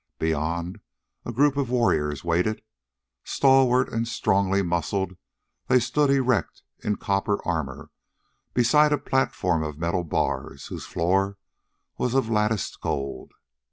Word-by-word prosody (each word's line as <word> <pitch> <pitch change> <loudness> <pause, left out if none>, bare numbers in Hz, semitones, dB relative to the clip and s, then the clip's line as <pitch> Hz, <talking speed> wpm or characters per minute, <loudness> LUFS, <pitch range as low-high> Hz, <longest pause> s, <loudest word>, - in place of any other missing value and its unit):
Beyond, 80 +3 -2 0.5
a - - -3
group 140 +4 +3
of 140 -4 0
warriors 75 - +1
waited. 90 +6 0 0.6
Stalwart 130 -2 +4
and 115 +1 -1
strongly 100 -4 +1
muscled, 90 +2 -1 0.5
they 125 - +5
stood 140 +4 +1
erect 130 -3 +1 0.2
in 105 - 0
copper 100 +1 0
armor 80 -6 -3 0.6
beside 150 +5 +4
a 150 - +3
platform 110 - 0
of 75 -2 -4
metal 85 +2 -1
bars, 70 -4 -2
whose - - -7
floor 95 +3 0 0.6
was 125 0 0
of 130 -4 +1
latticed 105 -2 0
gold. 70 0 -4
100 Hz, 120 wpm, -25 LUFS, 85-125 Hz, 0.6 s, they